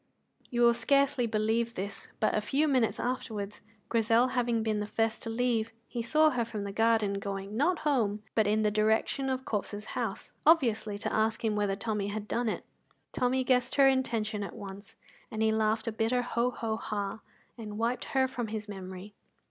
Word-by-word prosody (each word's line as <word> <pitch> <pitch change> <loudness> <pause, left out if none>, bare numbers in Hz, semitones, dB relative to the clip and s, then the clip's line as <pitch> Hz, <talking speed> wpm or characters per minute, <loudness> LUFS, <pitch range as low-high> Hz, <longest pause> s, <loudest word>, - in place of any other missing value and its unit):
You 240 -1 -1
will 235 0 +7
scarcely 275 -1 +2
believe 225 +2 0
this, 200 +2 -5
but 215 - +2
a 215 - +1
few 280 +8 +1
minutes 255 -6 +2
afterwards, 215 -5 -3 0.3
Grizel 230 +2 +3
having 240 -3 0
been 215 -1 0
the 210 - -3
first 225 +1 0
to 225 - -4
leave, 230 -1 0 0.2
he 240 - -3
saw 310 +6 +4
her 245 -2 0
from 220 -3 -5
the 200 - -4
garden 220 -2 +2
going, 195 +1 -5
not 315 +9 +2
home, 215 -8 +1
but 220 -2 +3
in 215 +1 +2
the 210 - +2
direction 220 +5 +1
of 260 0 -2
Corp's 210 0 -3
house, - - -4
obviously 235 -10 +3
to 205 - -3
ask 220 +1 +1
him 215 -1 +1
whether 205 -1 +1
Tommy 210 -1 -2
had 210 +1 -4
done 235 +1 0
it. - - -4 0.5
Tommy 255 +1 +1
guessed 250 -1 +2
her 275 -1 +6
intention 230 -5 +1
at 200 -4 -5
once, 200 +2 -9 0.3
and 220 -2 -2
he 220 - +4
laughed 220 0 +1
a 230 - -1
bitter 225 +3 +1
ho 240 0 0
ho 225 -3 -3
ha, 205 -1 -3 0.4
and 210 -3 -7
wiped 235 +3 0
her 265 -1 +2
from 245 -3 -4
his 215 0 -5
memory. 190 0 -8
225 Hz, 190 wpm, -30 LUFS, 210-245 Hz, 0.5 s, will